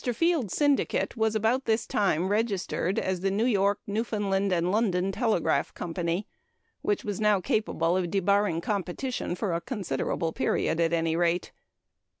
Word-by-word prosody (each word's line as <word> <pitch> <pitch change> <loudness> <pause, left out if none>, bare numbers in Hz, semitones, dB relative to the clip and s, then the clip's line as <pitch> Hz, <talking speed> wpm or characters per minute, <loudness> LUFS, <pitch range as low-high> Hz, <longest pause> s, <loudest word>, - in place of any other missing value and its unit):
Field's 320 - +1
syndicate 290 -4 +1
was 220 -1 +1
about 225 +5 +1
this 220 0 +1
time 190 -3 +1
registered 205 -3 0
as 185 -2 -1
the 195 - +1
New 205 +4 +1
York, 200 -4 +2
Newfoundland, 200 -2 -1
and 175 0 +1
London 195 -3 +1
Telegraph 215 -4 0
Company, 170 +3 -2 0.6
which 415 -1 0
was 205 -1 -3
now 210 -2 +4
capable 175 -3 0
of 180 -2 0
debarring 200 -2 +1
competition 200 +3 -3
for 180 -1 -2
a 170 - -1
considerable 165 - -2
period, 160 - 0
at 165 -1 +2
any 165 -1 +1
rate. 175 +1 0
195 Hz, 150 wpm, -27 LUFS, 175-220 Hz, 0.6 s, now